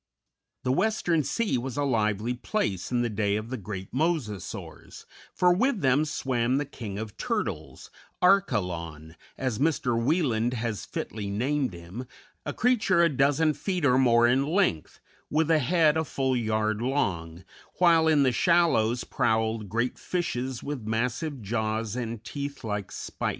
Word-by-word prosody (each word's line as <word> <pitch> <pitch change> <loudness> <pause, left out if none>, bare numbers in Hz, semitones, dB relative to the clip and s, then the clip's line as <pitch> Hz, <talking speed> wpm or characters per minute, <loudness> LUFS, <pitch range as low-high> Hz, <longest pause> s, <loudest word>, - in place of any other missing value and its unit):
The 125 - +1
western 175 -1 +1
sea 210 - 0
was 130 +1 -5
a 145 - +1
lively 110 -3 0
place 115 - -2
in 120 -1 +1
the - - +1
day 105 -1 0
of 110 +3 -4
the 130 - -2
great 95 -2 -7
Mosasaurs, 135 - -3 0.3
for 180 -1 +3
with 235 +3 +1
them 135 +3 +3
swam 130 -5 0
the 145 - -1
king 110 -8 -7
of 110 -1 -6
turtles, - - -4 0.3
Archelon, 85 - +1 0.2
as 130 -4 -2
Mr. 140 -5 +1
Wieland 120 -2 +1
has 110 -5 -3
fitly 105 -2 -5
named 130 +3 0
him, 90 +9 -8 0.4
a - - 0
creature 210 -8 +3
a 170 - +4
dozen 145 +3 +2
feet 180 -1 -2
or 130 -1 +4
more 120 -2 +5
in 125 +3 +3
length, 160 - 0 0.3
with 160 +1 +1
a 160 - +5
head 155 +2 +3
a 160 - +1
full 130 -2 -1
yard 110 -2 0
long, 95 - -2 0.3
while 165 -3 +4
in 150 -3 +4
the 130 - +3
shallows 125 -6 +3
prowled 110 -3 0
great 115 +4 -1
fishes 130 -8 -3
with 145 -3 -4
massive 125 +4 -2
jaws 110 +1 -2
and 115 -3 -4
teeth 140 -1 -6
like 105 -3 -3
spikes. - - -4
125 Hz, 155 wpm, -27 LUFS, 110-155 Hz, 0.4 s, more